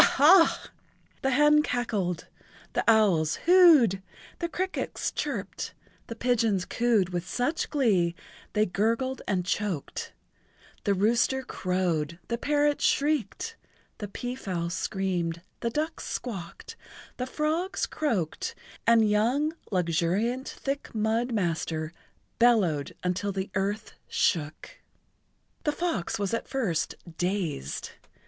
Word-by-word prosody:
ha's! 330 Hz, +5 st, +5 dB, 0.5 s
the 265 Hz, -, +1 dB
hen 295 Hz, +3 st, +5 dB
cackled, 205 Hz, -, -1 dB, 0.5 s
the -, -, +1 dB
owls 190 Hz, -9 st, +4 dB
whoo 345 Hz, -5 st, +8 dB
ed, 195 Hz, -3 st, 0 dB, 0.4 s
the 340 Hz, -, -2 dB
crickets 370 Hz, +3 st, -2 dB
chirped, -, -, -4 dB, 0.3 s
the 230 Hz, -, -6 dB
pigeons 225 Hz, -6 st, +1 dB
coo 235 Hz, -3 st, +2 dB
ed 185 Hz, -, -2 dB
with 175 Hz, -1 st, -3 dB
such 270 Hz, -, -1 dB
glee 195 Hz, -, +2 dB, 0.4 s
they 215 Hz, 0 st, +3 dB
gurgled 230 Hz, +8 st, 0 dB
and 185 Hz, -3 st, 0 dB
choked, 185 Hz, -4 st, -2 dB, 0.7 s
the 200 Hz, -, +3 dB
rooster 240 Hz, +6 st, +2 dB
crowed, 175 Hz, -, -1 dB
the 235 Hz, -, 0 dB
parrot 290 Hz, +1 st, +2 dB
shrieked, 300 Hz, -, 0 dB, 0.4 s
the 205 Hz, -, -4 dB
peafowl 195 Hz, -7 st, -4 dB
screamed, 175 Hz, -3 st, -2 dB, 0.2 s
the 235 Hz, -, -1 dB
ducks 310 Hz, +6 st, -2 dB
squawked, 225 Hz, -, -6 dB, 0.4 s
the 255 Hz, -, -3 dB
frogs 315 Hz, +7 st, -1 dB
croaked 210 Hz, -, -2 dB, 0.3 s
and 230 Hz, -2 st, +6 dB
young 245 Hz, +9 st, +2 dB, 0.2 s
Luxuriant 185 Hz, +8 st, 0 dB
Thick 275 Hz, -3 st, -4 dB
Mud 220 Hz, +3 st, +1 dB
Master 165 Hz, -5 st, -1 dB, 0.5 s
bellowed 200 Hz, -12 st, +3 dB
until 185 Hz, +3 st, -1 dB
the 190 Hz, 0 st, -4 dB
earth 205 Hz, +2 st, -2 dB
shook. 155 Hz, -4 st, -1 dB, 0.8 s
The 295 Hz, -, +2 dB
fox 290 Hz, -, -2 dB
was 200 Hz, -1 st, -2 dB
at 230 Hz, -, -2 dB
first 200 Hz, -, -1 dB, 0.2 s
dazed. 175 Hz, -, -2 dB
215 Hz, 115 wpm, -28 LUFS, 180-265 Hz, 0.8 s, whoo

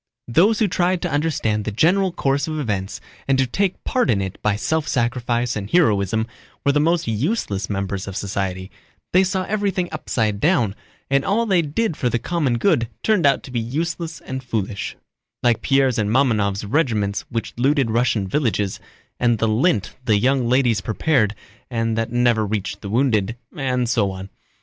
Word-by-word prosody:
Those 185 Hz, -, +4 dB
who 215 Hz, -, +2 dB
tried 180 Hz, 0 st, +1 dB
to 175 Hz, -, -1 dB
understand 145 Hz, -8 st, 0 dB
the 110 Hz, -, -3 dB
general 185 Hz, -, +3 dB
course 140 Hz, -1 st, 0 dB
of 155 Hz, -1 st, -3 dB
events 105 Hz, -5 st, -3 dB, 0.3 s
and 135 Hz, -1 st, +3 dB
to 135 Hz, -, +3 dB
take 190 Hz, +9 st, -1 dB
part 255 Hz, -, +1 dB
in 105 Hz, -4 st, +3 dB
it 95 Hz, -1 st, -5 dB
by 105 Hz, -1 st, +1 dB
self 155 Hz, +8 st, -1 dB
sacrifice 120 Hz, -1 st, 0 dB
and 100 Hz, -2 st, -4 dB
heroism 110 Hz, -, +2 dB, 0.4 s
were 140 Hz, -, +5 dB
the 145 Hz, -, +2 dB
most 165 Hz, 0 st, +1 dB
useless 110 Hz, -, -1 dB
members 100 Hz, -1 st, -3 dB
of 100 Hz, 0 st, -5 dB
society, 95 Hz, -1 st, -3 dB, 0.4 s
they 185 Hz, +1 st, +6 dB
saw 190 Hz, 0 st, -1 dB
everything 195 Hz, -3 st, -1 dB
upside 110 Hz, -9 st, -1 dB
down, 120 Hz, -, +2 dB, 0.4 s
and 140 Hz, 0 st, +3 dB
all 220 Hz, +8 st, +1 dB
they 190 Hz, -5 st, +3 dB
did 165 Hz, +5 st, -1 dB
for 125 Hz, -, 0 dB
the 120 Hz, -, 0 dB
common 140 Hz, -3 st, 0 dB
good 120 Hz, -, +2 dB
turned 205 Hz, -9 st, +3 dB
out 140 Hz, -, +2 dB
to 130 Hz, -, -10 dB
be 120 Hz, -, -1 dB
useless 160 Hz, +6 st, -3 dB
and 130 Hz, 0 st, -6 dB
foolish—like 110 Hz, +1 st, -3 dB
Pierre's 135 Hz, -3 st, +2 dB
and 105 Hz, -1 st, 0 dB
Mamónov's 105 Hz, -5 st, +1 dB
regiments 105 Hz, -6 st, 0 dB
which 115 Hz, -1 st, -3 dB
looted 135 Hz, -1 st, +2 dB
Russian 115 Hz, -4 st, +1 dB
villages, 105 Hz, -4 st, 0 dB, 0.4 s
and 120 Hz, -1 st, +3 dB
the 115 Hz, -, +1 dB
lint 110 Hz, -, +1 dB
the 110 Hz, -4 st, +3 dB
young 125 Hz, +2 st, +2 dB
ladies 125 Hz, -5 st, +3 dB
prepared 110 Hz, +1 st, +1 dB, 0.3 s
and 115 Hz, -2 st, -1 dB
that 115 Hz, 0 st, -2 dB
never 120 Hz, -2 st, +2 dB
reached 100 Hz, -1 st, -3 dB
the 100 Hz, -, -6 dB
wounded, 115 Hz, -3 st, +1 dB, 0.2 s
and 125 Hz, -4 st, 0 dB
so 115 Hz, -4 st, +1 dB
on. 95 Hz, 0 st, -7 dB
120 Hz, 175 wpm, -21 LUFS, 105-155 Hz, 0.4 s, they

